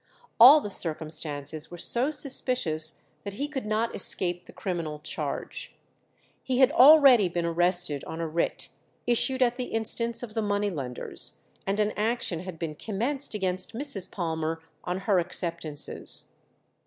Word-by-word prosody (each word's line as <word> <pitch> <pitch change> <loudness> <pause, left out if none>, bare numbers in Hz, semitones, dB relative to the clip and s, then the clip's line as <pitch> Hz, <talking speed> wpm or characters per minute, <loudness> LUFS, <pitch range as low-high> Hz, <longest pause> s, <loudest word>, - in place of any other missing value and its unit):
All 275 +6 +10
the 205 - -6
circumstances 155 -3 -4
were 175 - -9
so 240 - +2
suspicious 245 - 0 0.2
that 200 - -6
he 285 +7 -3
could 265 -7 -5
not 220 +2 -1
escape 175 -2 -1
the - - -12
criminal 170 -5 -4
charge. 150 +1 -5 0.7
He 255 -2 -2
had 260 +1 +5
already 275 - +7
been 175 0 -2
arrested 175 -3 +1
on 160 - -7
a 165 - -2
writ 165 +2 -1 0.4
issued 260 +2 +4
at 245 0 0
the 250 - -3
instance 230 +1 0
of 220 -3 -8
the 225 - -1
money 205 -1 -1
lenders, 130 -7 -1 0.3
and 200 +2 -1
an 210 0 +2
action 215 -5 -1
had 180 -1 -8
been 160 -2 -4
commenced 230 - -3
against 185 -2 -2
Mrs. 235 -8 -1
Palmer 160 -2 -3 0.2
on 180 +1 -3
her 195 -2 +2
acceptances. 165 -4 -3
195 Hz, 150 wpm, -27 LUFS, 165-240 Hz, 0.7 s, All